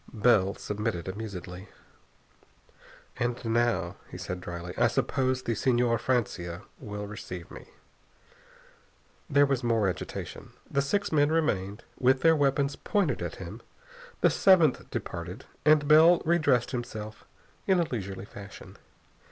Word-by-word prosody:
Bell 105 Hz, -3 st, +3 dB
submitted 105 Hz, -4 st, -3 dB
amusedly. 95 Hz, -2 st, -7 dB, 1.5 s
"And 120 Hz, 0 st, -2 dB
now," 115 Hz, -6 st, 0 dB
he -, -, -8 dB
said 90 Hz, 0 st, -5 dB
dryly, 85 Hz, 0 st, -6 dB
"I -, -, +4 dB
suppose 130 Hz, -1 st, 0 dB
the 115 Hz, -, -1 dB
Señor 120 Hz, 0 st, +2 dB
Francia 100 Hz, -8 st, -2 dB, 0.2 s
will 105 Hz, -4 st, -6 dB
receive 90 Hz, -4 st, -8 dB
me?" -, -, -11 dB, 1.6 s
There 145 Hz, +1 st, +5 dB
was 135 Hz, -3 st, -1 dB
more 115 Hz, -4 st, +2 dB
agitation. 90 Hz, -, -5 dB
The 140 Hz, -, 0 dB
six 200 Hz, +9 st, -1 dB
men 145 Hz, -1 st, +3 dB
remained; 105 Hz, -11 st, 0 dB, 0.2 s
with 130 Hz, +1 st, +3 dB
their 165 Hz, -1 st, +5 dB
weapons 140 Hz, -1 st, +1 dB
pointed 205 Hz, -5 st, 0 dB
at -, -, -4 dB
him. -, -, -8 dB, 0.6 s
The -, -, +5 dB
seventh 170 Hz, -8 st, +4 dB
departed, 90 Hz, +7 st, -6 dB, 0.2 s
and 150 Hz, -1 st, +5 dB
Bell 160 Hz, +3 st, +7 dB
re 170 Hz, +2 st, +3 dB
dressed 125 Hz, -6 st, +2 dB
himself 110 Hz, -4 st, -6 dB, 0.4 s
in 190 Hz, -2 st, +4 dB
a -, -, +4 dB
leisurely 100 Hz, -6 st, -5 dB
fashion. 100 Hz, -1 st, -11 dB
120 Hz, 130 wpm, -28 LUFS, 100-140 Hz, 1.6 s, Bell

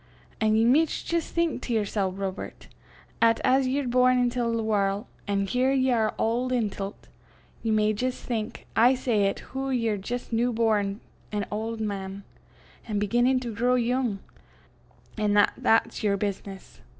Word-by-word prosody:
An' 215 Hz, -1 st, +3 dB
ye 225 Hz, +1 st, +4 dB
micht 295 Hz, +6 st, +2 dB
jist 335 Hz, -1 st, -1 dB
think 335 Hz, -2 st, 0 dB
to 240 Hz, -, -3 dB
yersel', 205 Hz, -3 st, 0 dB
Robert, 190 Hz, 0 st, -6 dB, 0.5 s
'at 230 Hz, 0 st, +4 dB
as 265 Hz, 0 st, +3 dB
ye 265 Hz, +2 st, 0 dB
are 265 Hz, -, -4 dB
born 255 Hz, +1 st, +4 dB
intil 245 Hz, -1 st, +1 dB
the 230 Hz, -1 st, -1 dB
warl', 205 Hz, 0 st, 0 dB, 0.2 s
an' 200 Hz, -1 st, 0 dB
here 250 Hz, +6 st, +1 dB
ye 260 Hz, -1 st, +2 dB
are 220 Hz, -3 st, +1 dB
auld 240 Hz, +3 st, 0 dB
intil 205 Hz, -4 st, -1 dB
't -, -, -25 dB, 0.5 s
ye 225 Hz, -, -2 dB
may 215 Hz, 0 st, +3 dB
jist 255 Hz, +4 st, -3 dB
think, 230 Hz, -1 st, -4 dB
I 245 Hz, +4 st, +5 dB
say, 225 Hz, -6 st, +1 dB
'at 195 Hz, -, -3 dB
hoo 270 Hz, 0 st, -2 dB
ye're 230 Hz, -5 st, 0 dB
jist 240 Hz, +5 st, -5 dB
new 240 Hz, +2 st, +2 dB
born 215 Hz, -2 st, +1 dB, 0.3 s
an 205 Hz, -1 st, -1 dB
auld 220 Hz, +1 st, -3 dB
man, 200 Hz, -2 st, -4 dB, 0.6 s
an' 215 Hz, -2 st, -2 dB
beginnin' 240 Hz, +5 st, +2 dB
to 235 Hz, -3 st, -5 dB
grow 245 Hz, +4 st, +2 dB
yoong, 245 Hz, -3 st, 0 dB, 1.0 s
an' 210 Hz, -1 st, +2 dB
'at 205 Hz, -, +5 dB
that's 225 Hz, -, +2 dB
yer 205 Hz, -2 st, +1 dB
business. 195 Hz, -1 st, -5 dB
225 Hz, 170 wpm, -26 LUFS, 205-250 Hz, 1.0 s, I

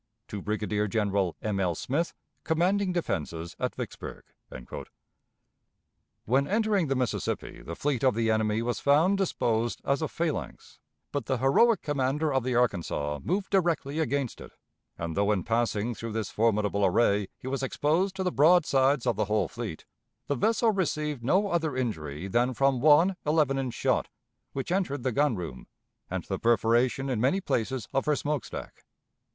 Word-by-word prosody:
_ -, -, -52 dB
"To 105 Hz, -, -5 dB
Brigadier 105 Hz, 0 st, -1 dB
General 100 Hz, -4 st, 0 dB
M. 105 Hz, -2 st, -1 dB
L. 90 Hz, -3 st, +1 dB
SMITH, 150 Hz, -, -2 dB, 0.3 s
commanding 185 Hz, +4 st, +1 dB
defenses 85 Hz, -, -3 dB
at -, -, -2 dB
Vicksburg." -, -, -7 dB, 2.0 s
When 135 Hz, +5 st, +2 dB
entering 210 Hz, -4 st, +1 dB
the 135 Hz, -, 0 dB
Mississippi 125 Hz, -2 st, -2 dB
the 85 Hz, -, -7 dB
fleet 140 Hz, +1 st, -1 dB
of 130 Hz, -4 st, +4 dB
the 115 Hz, -1 st, +1 dB
enemy 110 Hz, 0 st, +1 dB
was 120 Hz, -2 st, -1 dB
found 165 Hz, +8 st, +3 dB
disposed 120 Hz, -, 0 dB
as 140 Hz, +3 st, +1 dB
a 155 Hz, -, 0 dB
phalanx, 165 Hz, -1 st, -4 dB, 0.3 s
but 140 Hz, -6 st, -3 dB
the 130 Hz, -, +1 dB
heroic 175 Hz, -, +4 dB
commander 145 Hz, +1 st, 0 dB
of 135 Hz, -, +2 dB
the 125 Hz, -1 st, -1 dB
Arkansas 85 Hz, -11 st, 0 dB
moved 190 Hz, +3 st, -1 dB
directly 165 Hz, -6 st, +1 dB
against 140 Hz, -5 st, -1 dB
it; -, -, -11 dB, 0.4 s
and, 85 Hz, -1 st, -4 dB
though 100 Hz, +1 st, +2 dB
in 95 Hz, -4 st, 0 dB
passing 115 Hz, 0 st, 0 dB
through 115 Hz, 0 st, -6 dB
this 110 Hz, -3 st, -3 dB
formidable 105 Hz, -2 st, +1 dB
array 100 Hz, 0 st, +3 dB
he -, -, -15 dB
was 135 Hz, +1 st, -2 dB
exposed 160 Hz, +8 st, 0 dB
to 190 Hz, -, -2 dB
the 180 Hz, -, 0 dB
broadsides 145 Hz, -4 st, +4 dB
of 120 Hz, -4 st, +1 dB
the 110 Hz, -, +1 dB
whole 105 Hz, +1 st, +1 dB
fleet, 115 Hz, -9 st, -6 dB, 0.4 s
the -, -, 0 dB
vessel 225 Hz, -, +2 dB
received 150 Hz, -, -1 dB
no 195 Hz, -, +2 dB
other 160 Hz, -6 st, 0 dB
injury 80 Hz, -, -3 dB
than 120 Hz, +5 st, +1 dB
from 135 Hz, -1 st, +2 dB
one 160 Hz, +6 st, +5 dB
eleven 150 Hz, -3 st, +2 dB
inch 130 Hz, -3 st, -3 dB
shot -, -, 0 dB, 0.4 s
which 135 Hz, +4 st, -4 dB
entered 160 Hz, -9 st, -1 dB
the 130 Hz, -, +1 dB
gun 140 Hz, 0 st, +2 dB
room, 80 Hz, -9 st, -7 dB, 0.4 s
and -, -, -3 dB
the -, -, -4 dB
perforation 120 Hz, +3 st, +2 dB
in 125 Hz, -5 st, -1 dB
many 135 Hz, +10 st, +2 dB
places 130 Hz, -, -2 dB
of 135 Hz, +2 st, 0 dB
her 150 Hz, -, +3 dB
smoke 145 Hz, -1 st, -2 dB
stack. -, -, -8 dB
130 Hz, 170 wpm, -28 LUFS, 110-155 Hz, 2.0 s, one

